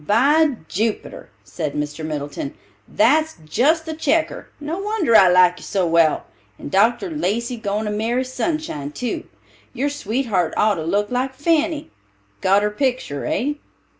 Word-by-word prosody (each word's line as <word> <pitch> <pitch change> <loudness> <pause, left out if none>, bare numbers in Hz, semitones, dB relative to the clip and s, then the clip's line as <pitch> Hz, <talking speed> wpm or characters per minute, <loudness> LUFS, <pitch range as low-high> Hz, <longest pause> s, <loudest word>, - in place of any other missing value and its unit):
"By 285 +7 +4
Jupiter!" 220 - -3
said 155 -4 -5
Mr. 150 +1 -3
Middleton, 145 -2 -4 0.3
"that's 310 +8 +2
just 305 - +2
the 320 - -4
checker. 315 +1 0
No 310 +5 -4
wonder 400 - +1
I 190 - +8
like 180 0 +5
you - - -12
so 190 -3 0
well. 165 -2 +3 0.3
And - - -8
Dr. 230 - +2
Lacey 235 -5 -1
goin' 215 -1 -2
to 210 - -2
marry 230 +4 0
Sunshine, 255 - -3
too. 245 +6 -3 0.5
Your 275 +4 0
sweetheart 220 - -1
ought 215 0 +4
to 160 - -3
look 205 +6 0
like 260 +1 -1
Fanny. 315 +1 0 0.5
Got 195 +2 +4
her 210 - +1
picter, 245 - -2
hey?" 290 +3 -1
235 Hz, 150 wpm, -21 LUFS, 185-295 Hz, 0.5 s, I